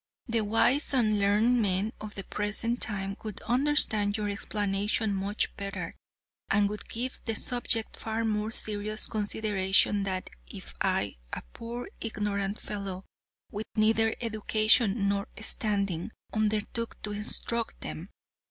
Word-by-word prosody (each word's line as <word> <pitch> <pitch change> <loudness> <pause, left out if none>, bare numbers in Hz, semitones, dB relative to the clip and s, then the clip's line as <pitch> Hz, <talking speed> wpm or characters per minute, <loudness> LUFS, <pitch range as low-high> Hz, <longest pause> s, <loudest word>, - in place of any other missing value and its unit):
The 230 -2 +1
wise 235 +7 +3
and 215 -4 +3
learned 215 +5 +4
men 200 +1 +1
of 210 -1 -7
the 195 - -4
present 210 +5 -2
time 195 -2 -1
would 215 -3 -5
understand 235 -5 +2
your 210 -1 -1
explanation 205 +1 0
much 200 +2 0
better, 200 -1 -5 0.5
and 205 0 +4
would 210 - -6
give 250 +3 -3
the 225 - -1
subject 230 -1 +1
far 225 +1 -2
more 215 0 0
serious 215 -1 +1
consideration 205 -2 +2
than 190 -1 -2 0.2
if - - -10
I, - - +1 0.2
a - - -3
poor 240 +1 -6
ignorant 205 -2 -2
fellow 195 -2 -5 0.5
with 215 +1 -4
neither 225 +1 +3
education 215 -1 +3
nor 200 0 0
standing, 200 -5 -1 0.2
undertook 215 +2 0
to 210 - -2
instruct 220 +2 -1
them. 170 +5 -6
210 Hz, 130 wpm, -29 LUFS, 200-225 Hz, 0.5 s, learned